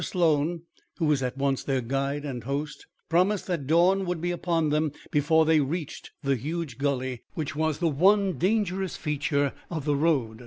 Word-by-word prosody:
Sloan, 165 -1 +1 0.3
who 165 - 0
was 150 -3 +2
at 125 +1 -3
once 135 -1 0
their 135 -2 0
guide 135 +4 -2
and 125 -5 -5
host, 145 +3 -4 0.2
promised 185 +4 +2
that 165 -8 -3
dawn 180 +5 +4
would 175 -1 -1
be 175 +2 -1
upon 170 -3 0
them 150 0 +1 0.2
before 160 +2 +3
they 160 0 +4
reached 150 +2 -3
the 140 -1 +2
huge 150 0 -4
gully 130 -3 -1
which 150 -3 -3
was 155 -1 0
the 175 - +1
one 185 +2 +3
dangerous 190 -2 0
feature 145 -2 0 0.2
of 160 -5 -4
the 145 -1 +2
road. 140 -8 +1
150 Hz, 180 wpm, -27 LUFS, 140-170 Hz, 0.3 s, dawn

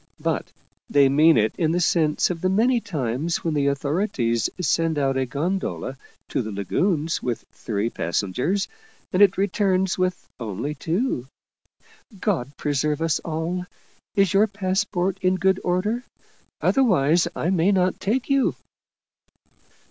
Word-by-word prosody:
But - - -2 0.4
they 140 -1 +5
mean 155 +4 +5
it 110 0 +2
in 160 -2 +2
the 175 - +1
sense 165 -2 +2
of 165 -2 -5
the 185 - +1
many 235 +6 +3
times 155 - -2
when 165 -3 0
the 145 -2 +1
authorities 140 - 0
send 165 -1 +1
out 135 -2 +1
a 130 -1 0
gondola 150 -1 -2 0.3
to - - 0
the 110 -2 -5
lagoons 155 - 0
with 120 -2 -3
three 105 0 -2
passengers, 115 - -1 0.5
and 185 - +3
it 195 -2 +6
returns 190 -2 +1
with 185 0 -1
only 115 +6 -3
two. 165 - -2 0.9
God 145 - -1
preserve 150 +1 0
us 165 -1 +1
all! 170 +3 -3 0.5
Is 195 -1 +3
your 205 +3 +5
passport 190 -2 -1
in 185 0 +2
good 190 +1 +2
order? 205 +7 0 0.6
Otherwise 175 - +3
I 175 - 0
may 185 +1 +3
not 185 -2 +1
take 240 +6 -1
you." 275 -1 +2
170 Hz, 140 wpm, -23 LUFS, 140-190 Hz, 0.9 s, it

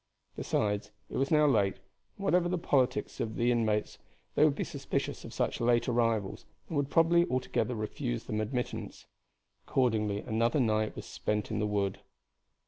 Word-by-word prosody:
Besides, 105 -1 -1 0.2
it - - -3
was 135 - +1
now 150 -1 +5
late, 105 -9 +3 0.4
and 200 - -9
whatever 180 -2 +3
the 180 - 0
politics 135 -6 +1
of 110 -1 -2
the 120 +1 +2
inmates 110 -3 0 0.3
they - - +4
would - - +4
be - - -1
suspicious - - -3
of - - -8
such - - -1
late 120 0 +3
arrivals, 115 -5 0 0.2
and 165 - -5
would 140 -1 0
probably 170 +2 +5
altogether 130 -1 -1
refuse 105 - -3
them 110 0 -2
admittance. 125 +3 -4 0.6
Accordingly 110 -5 +1
another 115 +5 +1
night 110 -3 +1
was - - -7
spent 105 0 -2
in 110 - -1
the 105 - +1
wood. 100 -2 -1
115 Hz, 165 wpm, -31 LUFS, 105-135 Hz, 0.6 s, now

